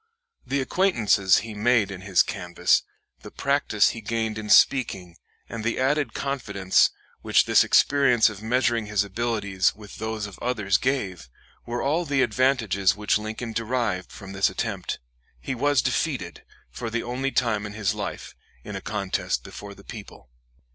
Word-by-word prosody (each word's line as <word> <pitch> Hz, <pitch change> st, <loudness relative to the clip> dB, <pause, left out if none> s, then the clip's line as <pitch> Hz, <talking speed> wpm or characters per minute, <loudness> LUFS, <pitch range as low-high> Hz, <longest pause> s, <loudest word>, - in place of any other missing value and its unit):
The 140 Hz, 0 st, 0 dB
acquaintances 115 Hz, -, +3 dB
he 110 Hz, -, -7 dB
made 110 Hz, -1 st, +2 dB
in 95 Hz, -1 st, -7 dB
his 95 Hz, -2 st, +3 dB
canvass, 90 Hz, 0 st, +1 dB, 0.4 s
the -, -, -11 dB
practice 140 Hz, -7 st, +2 dB
he 115 Hz, -, -6 dB
gained 110 Hz, 0 st, -2 dB
in 105 Hz, -1 st, -7 dB
speaking, 95 Hz, -12 st, +3 dB, 0.3 s
and 115 Hz, -2 st, -6 dB
the 115 Hz, +2 st, -1 dB
added 135 Hz, -2 st, +1 dB
confidence 100 Hz, -9 st, +1 dB, 0.3 s
which -, -, +3 dB
this -, -, +5 dB
experience 135 Hz, -5 st, +4 dB
of 110 Hz, -2 st, -5 dB
measuring 120 Hz, -1 st, +1 dB
his 105 Hz, -1 st, +1 dB
abilities 100 Hz, -2 st, -1 dB
with 105 Hz, 0 st, -12 dB
those 110 Hz, -1 st, -3 dB
of 100 Hz, -2 st, -10 dB
others 105 Hz, -6 st, 0 dB
gave, 95 Hz, -, -2 dB, 0.4 s
were 120 Hz, +1 st, -3 dB
all 160 Hz, +5 st, +1 dB
the 140 Hz, -3 st, +2 dB
advantages 115 Hz, -5 st, +2 dB
which 105 Hz, 0 st, +1 dB
Lincoln 110 Hz, +2 st, -5 dB
derived 115 Hz, -4 st, -2 dB
from 95 Hz, -1 st, -10 dB
this 95 Hz, +1 st, +2 dB
attempt. 95 Hz, -1 st, -3 dB, 0.4 s
He 60 Hz, -, -4 dB
was 145 Hz, +2 st, +2 dB
defeated, -, -, -2 dB, 0.3 s
for 115 Hz, -, -5 dB
the 120 Hz, +1 st, -2 dB
only 125 Hz, +3 st, -2 dB
time 110 Hz, -5 st, 0 dB
in 105 Hz, -, -9 dB
his 105 Hz, -2 st, -1 dB
life, -, -, -6 dB, 0.3 s
in -, -, -7 dB
a -, -, -5 dB
contest -, -, -2 dB
before 100 Hz, -1 st, -10 dB
the 100 Hz, -, -16 dB
people. 100 Hz, -, -11 dB
110 Hz, 160 wpm, -25 LUFS, 100-125 Hz, 0.4 s, this